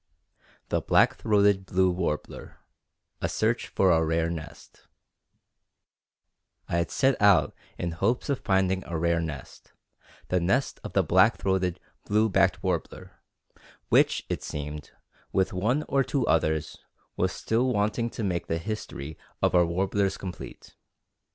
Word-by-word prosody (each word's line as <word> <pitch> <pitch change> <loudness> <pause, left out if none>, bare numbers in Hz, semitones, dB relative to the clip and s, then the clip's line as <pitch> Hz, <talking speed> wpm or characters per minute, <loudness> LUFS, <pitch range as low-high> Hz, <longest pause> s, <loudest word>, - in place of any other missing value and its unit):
THE - - 0
BLACK - - +3
THROATED 100 -2 +2
BLUE 95 0 +2
WARBLER 85 -4 -4 0.6
A - - -1
SEARCH - - 0
FOR 95 -2 +2
A 80 -1 +3
RARE 80 +1 0
NEST 80 -1 -10 1.8
I 85 - -1
had 85 - 0
set 135 -3 +1
out 100 -6 +5 0.2
in 85 - -3
hopes 100 +9 0
of 140 -3 0
finding 95 -1 +1
a 85 - -3
rare 85 +1 +1
nest, 75 -5 -8 0.6
the 90 - +2
nest 95 +11 0
of - - -7
the - - +3
black - - +4
throated 95 -2 0 0.3
blue 110 +2 +2
backed 95 -2 +2
warbler, - - -4 0.7
which, - - +3
it - - -3
seemed, 75 -1 -6 0.4
with 95 0 +1
one 115 +11 0
or 135 -1 +2
two 130 -2 -1
others, 80 -4 0 0.4
was - - 0
still 120 +3 0
wanting 110 +2 0
to 115 - -6
make 90 -3 -2
the 80 - -1
history 80 -6 -6 0.2
of - - +1
our 90 -1 +4
warblers 95 +2 0
complete. 90 -2 -9
95 Hz, 140 wpm, -27 LUFS, 85-105 Hz, 1.8 s, out